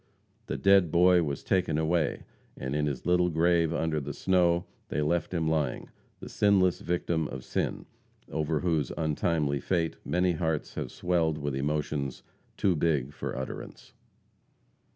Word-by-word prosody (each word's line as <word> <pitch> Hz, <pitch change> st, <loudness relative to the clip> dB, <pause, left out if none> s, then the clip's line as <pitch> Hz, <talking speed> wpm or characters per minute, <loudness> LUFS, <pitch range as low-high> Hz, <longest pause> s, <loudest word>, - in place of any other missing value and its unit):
The -, -, -2 dB
dead 100 Hz, -5 st, +4 dB
boy 90 Hz, +1 st, +5 dB
was 70 Hz, -4 st, -3 dB
taken 85 Hz, -5 st, +1 dB
away, 80 Hz, -1 st, 0 dB, 0.3 s
and 65 Hz, +2 st, -3 dB
in 75 Hz, 0 st, +1 dB
his 70 Hz, -4 st, -4 dB
little 90 Hz, 0 st, +3 dB
grave 85 Hz, 0 st, +2 dB
under 80 Hz, -2 st, 0 dB
the 70 Hz, 0 st, -6 dB
snow 85 Hz, -2 st, +2 dB, 0.2 s
they -, -, -2 dB
left 85 Hz, +2 st, 0 dB
him 85 Hz, -3 st, 0 dB
lying, 75 Hz, -5 st, -1 dB, 0.3 s
the -, -, -7 dB
sinless 95 Hz, -3 st, +3 dB
victim 85 Hz, -2 st, -1 dB
of 65 Hz, -2 st, -7 dB
sin, -, -, -2 dB, 0.5 s
over 75 Hz, 0 st, -1 dB
whose 80 Hz, -6 st, 0 dB
untimely 75 Hz, -2 st, 0 dB
fate 85 Hz, +3 st, -1 dB
many 90 Hz, +1 st, +1 dB
hearts 80 Hz, -2 st, -2 dB
have -, -, -4 dB
swelled 85 Hz, -3 st, 0 dB
with 70 Hz, -2 st, -3 dB
emotions 70 Hz, -1 st, -2 dB, 0.3 s
too 95 Hz, -3 st, +2 dB
big 75 Hz, -4 st, 0 dB
for -, -, -5 dB
utterance. 65 Hz, -, -7 dB
80 Hz, 150 wpm, -28 LUFS, 75-90 Hz, 0.5 s, boy